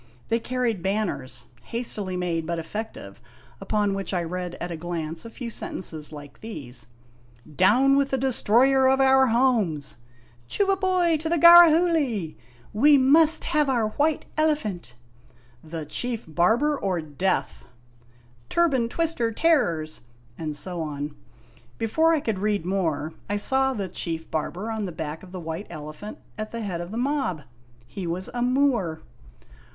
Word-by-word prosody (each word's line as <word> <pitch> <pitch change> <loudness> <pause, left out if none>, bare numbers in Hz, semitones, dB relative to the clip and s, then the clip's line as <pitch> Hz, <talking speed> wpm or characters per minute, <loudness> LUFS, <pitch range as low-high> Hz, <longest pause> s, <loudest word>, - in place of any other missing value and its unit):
They 230 - +2
carried 240 -4 -2
banners, 190 -9 -3
hastily 210 - -2
made 170 -3 -2
but 170 0 -2
effective, 165 - -7 0.4
upon 205 0 0
which 195 0 -3
I 175 - 0
read 180 +1 -5
at 175 - -6
a - - -3
glance 165 0 -5
a - - -7
few 235 0 -7
sen - - -5
tences 155 -5 -5
like 145 -2 -11
these: 140 - -7 0.3
" 120 +5 -21
Down 270 +6 +4
with 280 0 +2
the 265 - 0
Destroyer 265 +1 +3
of 265 0 +3
our 265 0 +5
Homes! 225 - +1 0.2
" 120 -1 -30
" 120 0 -30
Chubaiboy 375 -4 +2
to 320 +1 -3
the 340 - +2
Garahoogly! 325 - +6
' 120 -1 -27
" - - -26
We 295 -1 +8
must 300 +4 +5
have 305 -4 +1
our 235 -5 +1
White 295 +6 0
Elephant! 215 - -1 0.2
" 120 0 -29
" 120 0 -31
The 160 -2 -4
Chief 235 +8 -3
Barber 220 - +2
or 185 -3 -1
Death! 160 +5 -2 0.4
" 120 0 -31
"Turban 275 -9 +2
Twister 315 -7 0
Terrors!" 215 - +1 0.3
and 155 0 -4
so 175 +2 -2
on. 145 -1 -5 0.6
Before 320 +9 +2
I 320 -3 +2
could 220 -7 -2
read 205 -4 0
more, 165 -5 -1 0.2
I 205 - 0
saw 265 +5 +3
the 200 -3 -3
Chief 165 -2 -4
Barber 175 +8 -3
on 220 -2 -3
the 185 - -5
back 160 -1 -6
of 185 - -13
the 185 - -6
White 165 +4 -6
Elephant 155 +8 -8 0.2
at 215 0 -4
the 230 - -5
head 185 -5 -3
of 175 - -7
the 220 - -6
mob. 255 - -1 0.4
He 170 +10 -6
was 180 +3 -2
a 240 - -3
Moor. 245 - +1
200 Hz, 165 wpm, -25 LUFS, 160-265 Hz, 0.6 s, We